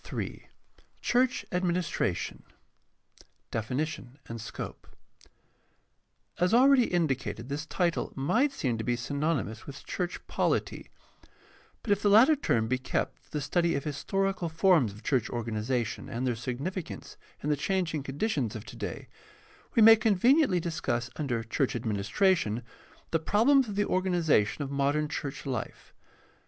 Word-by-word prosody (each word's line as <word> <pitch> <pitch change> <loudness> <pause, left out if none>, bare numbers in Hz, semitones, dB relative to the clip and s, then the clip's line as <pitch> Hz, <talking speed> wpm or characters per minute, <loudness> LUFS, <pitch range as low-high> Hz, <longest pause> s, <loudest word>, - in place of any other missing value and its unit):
III. - - -5 0.6
CHURCH 255 +2 +2
ADMINISTRATION 180 -1 -1
I. - - -25 1.0
DEFINITION 130 +3 -3
AND 115 -1 -6
SCOPE 115 - -7 1.5
As 180 +5 +3
already 260 0 +6
indicated, 130 - -1
this 150 +2 -4
title 175 -1 0
might 200 - +2
seem 120 - -2
to - - -2
be 120 +2 0
synony 140 +2 -1
mous 110 +2 -9
with 140 0 -9
church 180 -1 -3
poKty; - - -1 1.0
but 215 - -2
if 205 0 +3
the 205 - +3
latter 235 +9 +7
term 115 - 0
be 130 +2 0
kept 130 - -2
for - - -30
the 150 - -3
study 170 +4 +1
of 140 - -2
historical 190 +4 -1
forms 160 - +3
of 105 +3 -13
church 130 -4 +1
organization 115 0 -2
and 120 +3 -3
their 125 - +1
significance 140 - -5 0.3
in 150 - -1
the - - +3
changing 165 0 -1
conditions 135 - -2
of 110 - -7
today, - - -6 0.7
we 225 - +6
may 225 +1 +10
con 215 -1 +2
veniently 250 - +4
discuss 130 -8 -2
under 125 -7 -1
church 120 +4 -1
administration 115 - +1 0.5
the 165 - +2
problems 235 - +3
of 205 - -5
the 205 0 +2
organization 170 - +1
of 140 - -6
modern 140 +2 +1
church 145 -1 -5
life. 125 -5 -5
150 Hz, 145 wpm, -29 LUFS, 125-190 Hz, 1.5 s, may